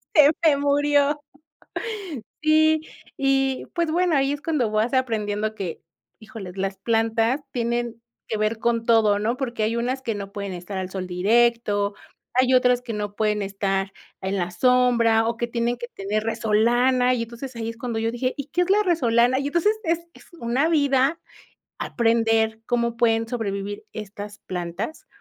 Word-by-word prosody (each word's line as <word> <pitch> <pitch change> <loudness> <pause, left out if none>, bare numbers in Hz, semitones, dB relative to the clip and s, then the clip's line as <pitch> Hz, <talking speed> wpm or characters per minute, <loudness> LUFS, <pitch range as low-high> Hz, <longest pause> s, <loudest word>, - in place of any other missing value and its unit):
Se 300 -2 +8
se 325 - +7
me - - -3
murió. 285 +1 +2 1.2
Sí, 315 0 +4 0.4
y 270 -1 +1
pues 340 -2 0
bueno, 350 0 +2
ahí 275 0 +2
es 290 - -6
cuando 285 -9 0
vas 215 +4 +1
aprendiendo 215 -4 0
que, 180 -6 -5 0.4
híjoles, 215 -5 -9
las 195 0 -2
plantas 225 +3 +1
tienen 235 -1 -2 0.3
que 220 - -2
ver 215 +1 0
con 230 0 0
todo, 220 -3 +4
¿no? 230 +4 -1
Porque 240 -5 -2
hay 220 +2 0
unas 255 +3 -1
que 230 -4 -2
no 200 -1 -6
pueden 200 -1 -4
estar 180 +2 -6
al 185 -1 -3
sol 185 -1 -5
directo, 205 +2 +2 0.4
hay 255 +1 +3
otras 250 -1 +4
que 245 -2 -6
no 205 -1 -4
pueden 210 -1 +1
estar 195 -1 -2 0.3
en 190 +1 -2
la 175 -1 -2
sombra, 235 +1 +3
o 230 0 -1
que 240 - -1
tienen 235 0 -1
que 240 0 -6
tener 205 +2 -2
resolana, 240 +3 +2
y 235 -2 -1
entonces 235 +3 -8
ahí 225 -1 -3
es 230 - -8
cuando 230 -1 -3
yo 225 0 0
dije: 255 +2 -1
"¿Y 280 -1 -5
qué 335 +5 0
es 355 - 0
la 415 +2 +4
resolana?". 255 - +3
Y 280 - -2
entonces, 345 +8 +1
es 330 -1 +1
es - - -17
una 245 +6 +1
vida 285 0 +2 0.6
aprender 225 -1 +1
cómo 235 -1 0
pueden 225 -1 +2
sobrevivir 205 -4 -4
estas 205 0 -8
plantas. 180 - -5
235 Hz, 170 wpm, -24 LUFS, 215-260 Hz, 1.2 s, Se